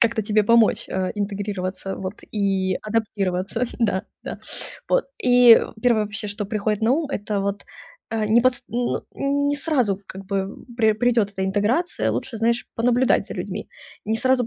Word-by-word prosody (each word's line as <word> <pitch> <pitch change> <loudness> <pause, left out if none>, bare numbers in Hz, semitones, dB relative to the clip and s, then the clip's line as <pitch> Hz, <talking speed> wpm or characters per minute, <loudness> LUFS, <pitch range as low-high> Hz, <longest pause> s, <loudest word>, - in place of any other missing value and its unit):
как-то 225 -1 +2
тебе 210 +1 +2
помочь, 230 +1 +4
а, 185 -1 -1
интегрироваться 200 -2 -3
вот 190 +1 -5 0.2
и 195 -3 +1
адаптироваться, 210 0 -1
да, 205 -4 +1 0.2
да. - - -6 0.5
Вот, - - +3 0.2
и 245 -2 +8 0.2
первое 235 -4 +4
вообще, 210 +1 -4
что 205 +1 -4
приходит 210 0 -1
на 230 +3 +4
ум, 305 0 0
это 205 -3 -2
вот, 200 0 -2 0.5
э, 220 -1 0
не 225 +3 +5
подс 255 -1 +2
ну 240 +2 -1
не 285 +1 0
сразу, 255 - +1
как 190 0 -9
бы, 195 0 -2 0.2
пре 220 -2 +4
придёт 230 -2 +2
эта 190 -1 -3
интеграция. 215 - +1
Лучше, 245 -4 -3
знаешь, 235 +2 0
понаблюдать 245 +2 +2
за - - -7
людьми, - - -5 0.4
Не 220 +1 0
сразу 255 0 +2
215 Hz, 160 wpm, -23 LUFS, 200-245 Hz, 0.5 s, и